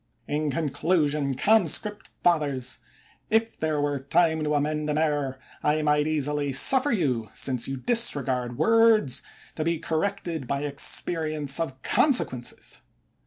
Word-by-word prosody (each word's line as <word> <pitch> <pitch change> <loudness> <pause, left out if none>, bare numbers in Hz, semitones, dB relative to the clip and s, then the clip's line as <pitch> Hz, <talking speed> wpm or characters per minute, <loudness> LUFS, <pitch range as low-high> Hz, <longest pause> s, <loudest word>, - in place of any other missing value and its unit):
In 150 +1 -1
conclusion, 145 -1 0
conscript 210 - +1
fathers, 140 -7 0 0.5
if 225 +1 +1
there 155 -2 -1
were 145 -1 -1
time 160 +3 +1
to 150 0 0
amend 150 +1 -1
an 150 - 0
error, 145 -4 -1 0.2
I 150 +1 +1
might 150 0 +2
easily 150 -2 -1
suffer 265 - +3
you, 125 - -1
since 125 -3 -2
you 135 0 -4
disregard 130 - 0
words, 225 - +3 0.3
to 155 - -3
be 165 +1 0
corrected 160 -3 -3
by 140 +2 -2
experience 150 +1 0
of 135 -5 -4
consequences. 240 - +1
150 Hz, 125 wpm, -25 LUFS, 140-170 Hz, 0.5 s, suffer